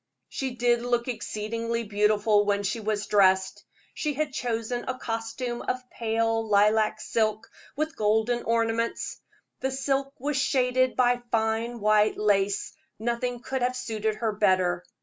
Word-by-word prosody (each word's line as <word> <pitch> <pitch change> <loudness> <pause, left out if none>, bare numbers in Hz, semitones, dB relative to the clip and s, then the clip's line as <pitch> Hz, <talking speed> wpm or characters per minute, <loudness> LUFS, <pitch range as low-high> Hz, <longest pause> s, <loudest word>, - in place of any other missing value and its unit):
She 265 -2 -4
did 240 -1 +2
look 240 0 0
exceedingly 230 0 -3
beautiful 210 0 +3
when 205 0 0
she 200 +4 -1
was 215 -1 -2
dressed. 190 -2 +3 0.3
She 300 -2 -2
had 300 -1 -2
chosen 240 -1 -2
a 255 - -2
costume 230 +1 -4
of 255 0 -3
pale 225 0 0
lilac 215 +1 +3
silk, 220 0 -1 0.3
with 310 +2 -2
golden 220 +3 +1
ornaments. 230 0 -1 0.4
The 265 - -1
silk 270 +1 -1
was 285 +2 -1
shaded 255 -2 +2
by 245 -1 +3
fine 225 +1 0
white 215 0 +3
lace 200 -1 +1 0.2
nothing 240 +1 -2
could 265 +1 -3
have 250 +1 +1
suited 220 -3 -2
her 225 0 -1
better. 185 -4 +2
230 Hz, 140 wpm, -27 LUFS, 215-245 Hz, 0.4 s, beautiful